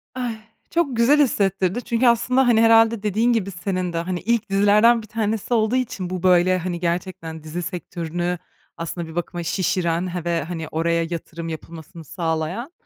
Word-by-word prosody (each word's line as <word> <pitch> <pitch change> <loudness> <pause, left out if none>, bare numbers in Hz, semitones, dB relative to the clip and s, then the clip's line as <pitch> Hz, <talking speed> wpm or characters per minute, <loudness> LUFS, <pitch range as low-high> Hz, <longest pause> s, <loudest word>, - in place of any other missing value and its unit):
Ay, 245 -3 -3 0.3
çok 320 -6 0
güzel 260 +6 +5
hissettirdi 195 -3 +1
çünkü 235 +2 +1
aslında, 250 +2 +3
hani, 225 -2 +5
herhâlde 225 -1 +5
dediğin 220 +4 +2
gibi 200 -4 -1
senin 180 -1 -3
de, - - -2
hani, 175 +2 -2
ilk 230 +1 0
dizilerden 210 +4 +4
bir 220 - -13
tanesi 220 +1 -2
olduğu 220 +1 +2
için 215 -8 -2
bu, 185 -1 -4
böyle, 185 0 +4
hani, 175 -1 -3
gerçekten 170 -2 -3
dizi 160 +3 -5
sektörünü 175 0 -3 0.4
aslında 165 0 -5
bir 160 - -10
bakıma 175 0 -3
şişiren 175 0 0
he 175 -1 -4
ve, 170 -2 0
hani, 160 0 -5
oraya 170 +2 0
yatırım 165 0 -6
yapılmasını 160 +1 -9
sağlayan. 165 - -3
185 Hz, 170 wpm, -22 LUFS, 170-225 Hz, 0.4 s, güzel